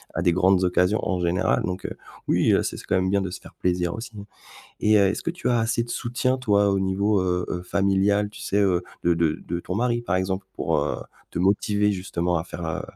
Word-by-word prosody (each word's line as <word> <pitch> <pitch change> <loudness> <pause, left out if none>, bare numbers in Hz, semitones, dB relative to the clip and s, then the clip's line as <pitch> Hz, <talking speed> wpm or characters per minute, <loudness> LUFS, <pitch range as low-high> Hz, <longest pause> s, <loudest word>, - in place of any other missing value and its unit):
à 80 - 0
des 85 -2 +3
grandes 95 0 +3
occasions, 90 +3 +2
en 90 -1 0
général. 85 +1 +1
Donc 90 +1 -4
heu, - - -4 0.3
oui, - - +3
heu, - - +3
c'est - - -3
c'est - - -10
quand - - 0
même 95 0 +1
bien 100 0 +2
de 95 - -3
se 90 - -6
faire - - -14
plaisir 90 -1 0
aussi 115 +1 -7 0.7
et 105 0 +5
heu, 100 -1 +5
est-ce 100 - -3
que - - -1
tu 175 -6 -3
as 120 -1 +3
assez 115 +1 +1
de 120 - -11
soutien, 130 +2 -1
toi, 105 -4 +3
au 100 - +1
niveau, 95 +2 +1
heu 90 -1 0
heu, 90 - -3
familial? 100 +2 +1
Tu 105 -1 -12
sais, 100 - -1
heu, 95 -3 +3 0.2
de 85 - +4
de 80 -2 +1
de 85 0 -3
ton 90 - -4
mari, 120 +1 +1
par 105 -6 -1
exemple? 95 +1 -2
Pour, - - 0
heu, - - -1 0.3
te - - -5
motiver, 105 +2 +2
justement, 90 -2 -1
à 80 - -2
faire, 85 -1 -6
heu, 80 -1 -2
95 Hz, 245 wpm, -24 LUFS, 90-105 Hz, 0.7 s, et